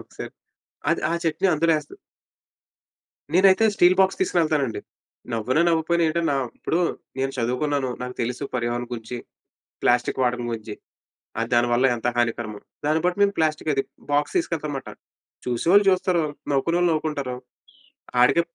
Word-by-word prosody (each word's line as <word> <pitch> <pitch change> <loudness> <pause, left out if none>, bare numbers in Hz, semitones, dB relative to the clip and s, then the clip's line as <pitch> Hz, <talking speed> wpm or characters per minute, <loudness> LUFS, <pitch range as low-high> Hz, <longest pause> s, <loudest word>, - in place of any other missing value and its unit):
ఒకసారి, - - -9 0.6
అది - - +1
ఆ - - -1
చెట్ని 165 +4 +1
అందులో 165 +2 +2
ఎస్త 145 - -14 1.4
నేనైతే 190 +4 +5
స్టీల్ 180 -1 +5
బాక్స్ 190 0 +3
తీసుకొనెళ్తానండి. 155 - +1 0.5
నవ్వినా, 120 +7 +1
నవ్వకపోయిన 170 +1 +2
ఏంటని 165 +1 0
నా 140 - +1 0.2
ఇప్పుడు 165 - -1 0.4
నేను 135 0 -1
చదువుకున్నాను, 130 +3 0
నాకు 125 0 -5
తెలుసు, 125 +4 -3
పర్యావరణం 120 0 -2
గురించి. 120 +1 -6 0.6
ప్లాస్టిక్ 125 +2 +2
వాడకం 120 -1 0
గురించి. 110 -2 -5 0.7
ఆ 115 - +1
దానివల్ల 120 +1 +3
ఎంత 120 0 -4
హానికరమో. 115 -3 -1 0.3
దాన్ని 155 +2 +2
బట్టి 180 +2 +1
మేము 200 0 +3
ప్లాస్టిక్ 155 -1 0
అది 135 - +1 0.3
బాక్స్ 145 +1 +1
తీసుకెళ్తానమాట. 155 - -2 0.6
చూసేవాళ్ళు 170 - +4
చూస్తారు, 185 -2 +1 0.3
నవ్వుకునే 155 +5 +1
వాళ్ళు 175 -1 +3
నవ్వుకుంటారు. 150 -5 -2 0.9
ఆడికే 145 +7 +5
145 Hz, 135 wpm, -24 LUFS, 120-170 Hz, 1.4 s, నేనైతే